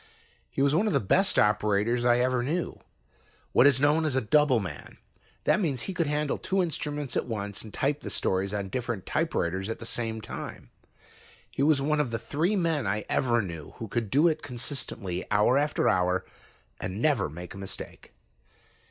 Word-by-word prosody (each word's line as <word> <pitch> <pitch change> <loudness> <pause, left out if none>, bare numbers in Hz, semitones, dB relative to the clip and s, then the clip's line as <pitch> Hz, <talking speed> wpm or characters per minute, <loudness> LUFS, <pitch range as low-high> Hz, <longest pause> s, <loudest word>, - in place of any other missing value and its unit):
He 135 - 0
was 140 0 +3
one 195 +8 +3
of 210 - +1
the - - +4
best 195 - +2
operators 105 +3 +2
I 120 0 +5
ever 125 0 +2
knew, 160 +8 -2 0.7
what 135 - +6
is 135 -2 +4
known 150 +3 +3
as 150 -4 0
a - - +4
"double" 150 +1 +4
man. 90 -8 -7 0.5
That - - +3
means 145 - 0
he 190 - -4
could 170 -3 0
handle 150 0 0
two 190 -1 +1
instruments 150 -4 -3
at - - 0
once 100 -3 -4
and 110 - -10
type 145 +5 0
the - - -6
stories 95 +1 0
on 100 -2 -3
different 115 -4 -3
typewriters 95 - -1
at 115 - -3
the 115 - -9
same 115 -1 -2
time. 110 - -8 0.8
He - - -3
was 140 -1 +4
one 150 +1 +1
of 145 -4 +1
the 115 - -2
three 160 - 0
men 165 -6 0
I 105 +2 -1
ever 120 -3 +2
knew 85 -5 -7
who 115 - -6
could 115 +1 -2
do 145 - +4
it 155 -2 0
consistently, 120 -8 -3
hour 105 +4 +4
after 150 +1 +1
hour, 90 0 +2 0.5
and 95 +3 -4
never 120 - +2
make 90 +4 -8
a 100 - -9
mistake. 95 0 -8
120 Hz, 190 wpm, -28 LUFS, 105-150 Hz, 0.8 s, what